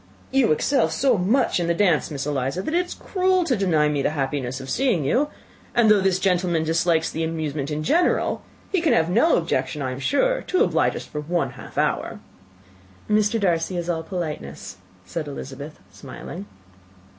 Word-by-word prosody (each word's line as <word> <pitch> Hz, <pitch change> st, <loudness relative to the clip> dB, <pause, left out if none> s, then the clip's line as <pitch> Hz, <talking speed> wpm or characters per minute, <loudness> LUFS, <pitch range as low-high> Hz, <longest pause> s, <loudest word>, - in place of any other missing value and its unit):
"You 265 Hz, -6 st, +3 dB
excel 265 Hz, -, +2 dB
so 260 Hz, -3 st, +2 dB
much 205 Hz, +4 st, +2 dB
in 170 Hz, -, -1 dB
the 170 Hz, -, +1 dB
dance, 175 Hz, -4 st, +2 dB
Miss 140 Hz, -3 st, -4 dB
Eliza, 145 Hz, +4 st, -2 dB
that 310 Hz, -, -3 dB
it 355 Hz, +1 st, +2 dB
is -, -, -7 dB
cruel 370 Hz, -1 st, +1 dB
to 275 Hz, -7 st, +1 dB
deny 170 Hz, -7 st, +2 dB
me 150 Hz, -1 st, 0 dB
the -, -, +1 dB
happiness 135 Hz, -2 st, -2 dB
of 135 Hz, -, -8 dB
seeing 225 Hz, -, +1 dB
you; 255 Hz, -, +2 dB, 0.5 s
and 230 Hz, -3 st, +5 dB
though 205 Hz, -2 st, +5 dB
this 190 Hz, -1 st, +2 dB
gentleman 180 Hz, -3 st, +1 dB
dislikes 165 Hz, 0 st, +1 dB
the 165 Hz, -, -2 dB
amusement 155 Hz, -3 st, -3 dB
in 155 Hz, 0 st, -3 dB
general, 340 Hz, -, +2 dB, 0.3 s
he 375 Hz, -, +1 dB
can 330 Hz, -, +3 dB
have 165 Hz, +1 st, +2 dB
no 240 Hz, -, +4 dB
objection, 150 Hz, -4 st, -1 dB
I 130 Hz, -, -2 dB
am 130 Hz, -, -6 dB
sure, -, -, +1 dB
to 370 Hz, -, +2 dB
oblige -, -, +1 dB
us -, -, -6 dB
for 150 Hz, -, -5 dB
one 170 Hz, +3 st, -1 dB
half -, -, -12 dB
hour." -, -, 0 dB, 0.9 s
"Mr. 210 Hz, +1 st, +2 dB
Darcy 180 Hz, -2 st, 0 dB
is 175 Hz, 0 st, -1 dB
all 165 Hz, -1 st, -2 dB
politeness," 160 Hz, -, -6 dB, 0.3 s
said 155 Hz, -, -4 dB
Elizabeth, 140 Hz, +1 st, -8 dB
smiling. 100 Hz, +1 st, -9 dB
170 Hz, 185 wpm, -23 LUFS, 150-220 Hz, 0.9 s, and